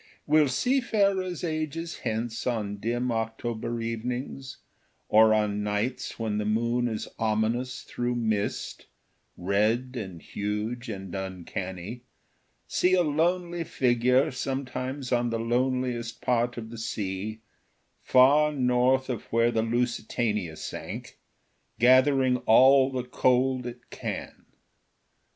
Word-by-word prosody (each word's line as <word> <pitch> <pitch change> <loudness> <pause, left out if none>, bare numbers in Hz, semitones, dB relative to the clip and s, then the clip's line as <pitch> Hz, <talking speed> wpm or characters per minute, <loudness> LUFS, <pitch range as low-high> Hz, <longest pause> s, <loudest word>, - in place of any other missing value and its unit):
Will 150 0 +4
seafarers 200 - +1
ages 160 0 -3
hence 115 0 -3
on 105 -4 -2
dim 120 +4 -1
October 115 +1 -3
evenings, 125 +4 -4 0.5
or 110 +1 +6
on 105 -1 +1
nights 105 +5 -2
when 110 -2 -1
the - - -1
moon 115 +3 +1
is 110 -2 -3
ominous 115 +3 0
through 120 0 -2
mist, 110 -3 -2 0.5
red 105 +7 +1
and 95 -7 -6
huge 105 +6 -4
and 95 -2 -6
uncanny, 95 +3 -5 0.7
see 185 +1 +3
a 180 - +3
lonely 170 +3 0
figure 125 +1 +2
sometimes 130 0 -4
on 120 -1 +2
the 115 - -1
loneliest 120 0 -1
part 120 0 0
of 110 -1 -6
the 115 - -8
sea, 105 0 -4 0.6
far 145 +4 +5
north 130 -1 +2
of 125 -3 -4
where 115 +1 +2
the 115 -1 +1
Lusitania 115 -5 -1
sank, - - -7 0.6
gathering 130 +1 +5
all 130 +3 +6
the 130 -1 -2
cold 125 0 +1
it 120 0 -10
can? - - -6
120 Hz, 115 wpm, -27 LUFS, 110-130 Hz, 0.7 s, or